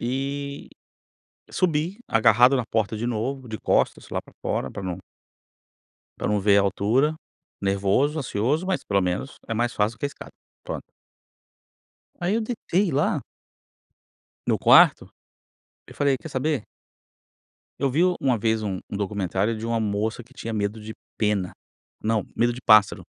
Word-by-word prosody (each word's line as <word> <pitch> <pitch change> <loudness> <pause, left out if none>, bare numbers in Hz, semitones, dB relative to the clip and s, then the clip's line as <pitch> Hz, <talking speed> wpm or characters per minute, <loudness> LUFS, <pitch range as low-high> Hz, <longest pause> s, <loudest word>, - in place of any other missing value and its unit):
e 140 +3 -3 0.8
subi 170 +3 0
agarrado 120 +4 +5
na 125 -3 0
porta 110 -1 -1
de 110 +2 -3
novo, 125 +2 -3
de 110 - -4
costas - - +1
lá - - -2
pra - - -20
fora, - - -2
pra 100 - -6
não 90 -2 -4 1.2
pra - - -2
não 105 0 +1
ver 100 0 +4
a - - +5
altura, 115 - +1 0.5
nervoso, 100 +10 +1
ansioso, 135 - 0
mas 190 0 -1
pelo 100 -1 +1
menos 90 +9 -2
é 115 - -2
mais 120 +2 0
fácil 110 +2 0
do - - -37
que - - -1
a - - +2
escada, 140 - -11 0.3
pronto. - - -5 1.4
Aí 175 +3 0
eu 230 - +1
deitei 210 -5 -1
lá 145 +2 +1 1.2
no - - +2
quarto, - - +6 0.8
eu - - -13
falei: 140 -2 +2
“Quer 160 - -9
saber?" 140 -2 -1 1.2
Eu 140 - +1
vi 150 +7 +2
o 180 -1 +3
uma 130 -3 +2
vez 110 +1 +1
um 100 -3 -2
um - - -5
documentário 100 +1 -1
de 110 - -5
uma 115 0 0
moça 110 +2 -1
que 120 +4 -22
tinha 115 -4 -5
medo 105 +1 -2
de 110 +1 -8 0.2
pena, 105 -4 0 0.5
não, 110 -2 +1
medo 120 +1 +2
de 125 - -9
pássaro, 105 -3 +5
115 Hz, 160 wpm, -24 LUFS, 105-140 Hz, 1.4 s, quarto